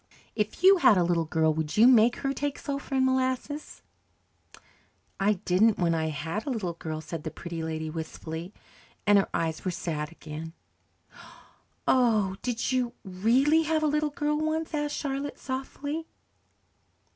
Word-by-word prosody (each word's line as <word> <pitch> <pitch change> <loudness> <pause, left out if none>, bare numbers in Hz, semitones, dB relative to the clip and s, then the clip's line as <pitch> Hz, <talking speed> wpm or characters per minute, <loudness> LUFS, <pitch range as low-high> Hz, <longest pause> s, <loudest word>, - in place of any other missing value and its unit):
If 210 - -2
you 385 +1 +8
had 230 - +6
a 180 - +4
little 170 -1 +1
girl, 160 0 +2
would 155 +2 -3
you 220 - +7
make 240 -1 +6
her 275 0 -2
take 285 0 -3
sulphur 280 -1 -4
and 260 -1 +3
molasses?" 260 +3 -1 1.4
"I 200 +2 +3
didn't 200 +3 +2
when 170 -2 +2
I 160 -1 0
had 160 - -4
a - - 0
little 210 -9 -2
girl," 155 -1 -5
said 165 0 -6
the - - -3
Pretty 165 +1 -6
Lady 160 0 -3
wistfully, 160 +2 -6 0.5
and 205 -1 +6
her 195 - -1
eyes 160 -1 -2
were 185 - -1
sad 160 -3 -3
again. 160 0 -8 1.3
"Oh, 220 -7 +3
did 245 0 -2
you 250 -2 0
really 235 +12 +3
have 315 0 0
a - - +3
little 300 0 +1
girl 295 +1 -1
once?" 315 +1 -1
asked 295 -1 -1
Charlotte 280 0 -3
softly. 285 +4 -4
215 Hz, 155 wpm, -28 LUFS, 165-280 Hz, 1.4 s, you